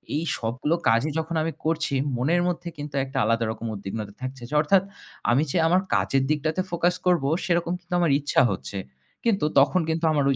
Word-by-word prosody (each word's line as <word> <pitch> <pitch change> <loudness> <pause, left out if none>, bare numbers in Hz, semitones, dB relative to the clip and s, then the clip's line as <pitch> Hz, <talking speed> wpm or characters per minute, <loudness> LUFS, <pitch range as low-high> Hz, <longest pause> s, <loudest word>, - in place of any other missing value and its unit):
এই 155 - 0
সবগুলো 125 +8 -1
কাজই 115 +7 +3
যখন 160 +1 -3
আমি 165 - -1
করছি 160 -3 0 0.2
মনের 165 +8 +2
মধ্যে 175 0 -3
কিন্তু 145 0 -7
একটা 135 0 -7
আলাদা 115 +1 +1
রকম 110 +1 -7
উদ্বিগ্নতা 100 +1 -6
থাকছে। 130 0 -6 0.2
অর্থাৎ 185 +4 +4 0.5
আমি 135 +5 +3
যে - - 0
আমার 180 +3 +3
কাজের 135 -1 +2
দিকটাতে 155 +4 0
focus 175 +1 +1
করব 175 -6 +3 0.2
সেরকম 170 -1 +1
কিন্তু 180 0 -9
আমার 170 -4 +3
ইচ্ছা 145 - +2
হচ্ছে। 100 +1 -5 0.5
কিন্তু 200 -9 +2
তখন 165 +6 +4
কিন্তু 160 +1 0
আমার 145 -2 +2
ওই - - +1
155 Hz, 185 wpm, -25 LUFS, 130-170 Hz, 0.5 s, অর্থাৎ